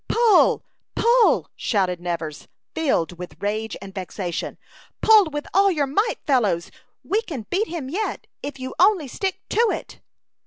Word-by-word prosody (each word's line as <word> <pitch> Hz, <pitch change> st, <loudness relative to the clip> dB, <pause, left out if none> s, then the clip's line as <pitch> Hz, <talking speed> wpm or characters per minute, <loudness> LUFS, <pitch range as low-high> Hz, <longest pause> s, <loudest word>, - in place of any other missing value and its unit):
"Pull! 465 Hz, -2 st, +4 dB, 0.3 s
Pull!" 475 Hz, 0 st, +3 dB
shouted 185 Hz, -5 st, 0 dB
Nevers, 165 Hz, -4 st, -4 dB, 0.3 s
filled 180 Hz, -, 0 dB
with 180 Hz, -, -8 dB
rage 215 Hz, +2 st, -2 dB
and 195 Hz, -1 st, -10 dB
vexation. 185 Hz, -2 st, -4 dB, 0.4 s
"Pull 435 Hz, -2 st, +7 dB
with 295 Hz, 0 st, -4 dB
all 395 Hz, +2 st, +5 dB
your 305 Hz, -6 st, +1 dB
might, 410 Hz, -, 0 dB
fellows. 210 Hz, -, +1 dB, 0.3 s
We 420 Hz, +3 st, 0 dB
can 280 Hz, -, -7 dB
beat 410 Hz, +5 st, +1 dB
him 325 Hz, -6 st, -5 dB
yet, 390 Hz, +10 st, -3 dB, 0.2 s
if 280 Hz, -1 st, -6 dB
you 260 Hz, 0 st, -5 dB
only 370 Hz, -5 st, +4 dB
stick 380 Hz, +9 st, -3 dB
to -, -, -1 dB
it." -, -, -5 dB
280 Hz, 150 wpm, -23 LUFS, -, 0.4 s, Pull